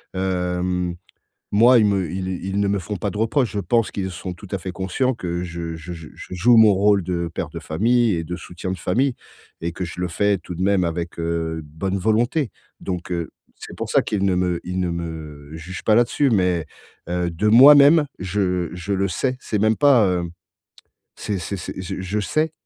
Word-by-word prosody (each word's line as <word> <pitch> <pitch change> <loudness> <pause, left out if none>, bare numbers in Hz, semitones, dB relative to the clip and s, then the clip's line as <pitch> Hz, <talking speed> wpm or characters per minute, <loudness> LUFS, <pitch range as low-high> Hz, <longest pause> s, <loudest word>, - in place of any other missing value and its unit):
hem, 90 -1 -1 0.6
moi, 120 +4 +6
ils 105 - +4
me 95 -4 +1
ils 95 0 -4 0.2
ils 95 +1 -1
ne 100 - +1
me 100 - +1
font 100 +3 -5
pas 100 +4 -2
de 105 - -6
reproches. 115 +2 +1
Je 105 - -3
pense 110 +4 +1
qu'ils 95 -2 -4
sont 90 +1 -6
tout 90 +3 -12
à 100 - 0
fait 95 0 -5
conscients 95 +8 -1
que 90 -6 -4
je 85 -2 -5
je 80 +2 -8
je 80 -3 -9
je - - -9
joue 115 +7 +4
mon 110 -2 +7
rôle 100 0 +3
de 85 -1 -2
père - - -3
de - - -6
famille 115 +6 +1
et 85 - -2
de 90 +2 -5
soutien 90 +1 -7
de 95 - -3
famille 125 - +1 0.5
et 85 +1 -3
que 90 - -4
je 85 +1 -7
le 90 - 0
fais 100 +3 +1
tout 90 +1 -8
de 90 - -4
même 95 -2 +2
avec, 85 0 -4
heu, 80 -1 -2
bonne 85 +6 -3
volonté. 115 - +1 0.3
Donc 90 -1 -5
heu, 85 -2 -3 0.3
c'est - - -9
pour - - -4
ça - - +4
qu'ils 100 -2 -2
ne 95 -2 +2
me 90 -1 0
ils 90 +1 -3
ne 90 - 0
me 80 -4 -6
jugent 85 +3 -7
pas 110 - +3
là-dessus. 120 +4 +3
Mais, 90 -6 +2 0.5
heu, 90 0 -1
de 85 +6 0
moi-même, 145 +6 +8
je 90 -2 -1
je 90 +3 -3
le 100 0 0
sais. 130 +7 -1
C'est 105 - -2
même 110 +2 +2
pas, 135 -8 +5
heu 90 -2 -1 0.9
c'est 100 -3 -3
c'est 95 +3 -4
c'est 85 - -6
je 95 0 -5
je 95 +3 -2
sais 155 +10 0
95 Hz, 215 wpm, -22 LUFS, 85-105 Hz, 0.9 s, moi-même